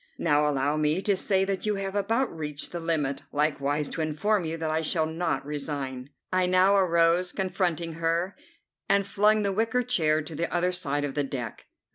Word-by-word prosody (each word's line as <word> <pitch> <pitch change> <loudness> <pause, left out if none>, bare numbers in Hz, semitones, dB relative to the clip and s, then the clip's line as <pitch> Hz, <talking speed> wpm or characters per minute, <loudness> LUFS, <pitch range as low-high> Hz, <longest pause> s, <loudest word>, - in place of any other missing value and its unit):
Now 150 0 +2
allow 145 +1 0
me 155 +3 +1
to 200 -1 +2
say 190 0 +1
that 195 +1 -2
you 210 - +1
have 195 -1 -3
about 225 +3 0
reached 150 -2 -4
the 175 - -4
limit, 150 -5 -1
likewise 145 0 0
to - - -4
inform 175 +6 0
you 160 +1 -3
that 160 -1 -2
I 160 +1 +1
shall 160 0 +1
not 165 -1 -2
resign." 140 -3 -4 0.2
I 185 -1 +3
now 185 +2 +4
arose, 175 -1 +3
confronting 175 -3 -1
her, 170 +4 0 0.5
and 200 0 +3
flung 210 +2 +3
the 200 -1 0
wicker 225 +4 +1
chair 155 -11 +2
to 160 - -9
the 165 +3 -2
other 175 +1 +1
side 145 -5 -2
of 145 -2 -2
the 145 - 0
deck. 125 -5 -6
165 Hz, 190 wpm, -27 LUFS, 150-190 Hz, 0.5 s, now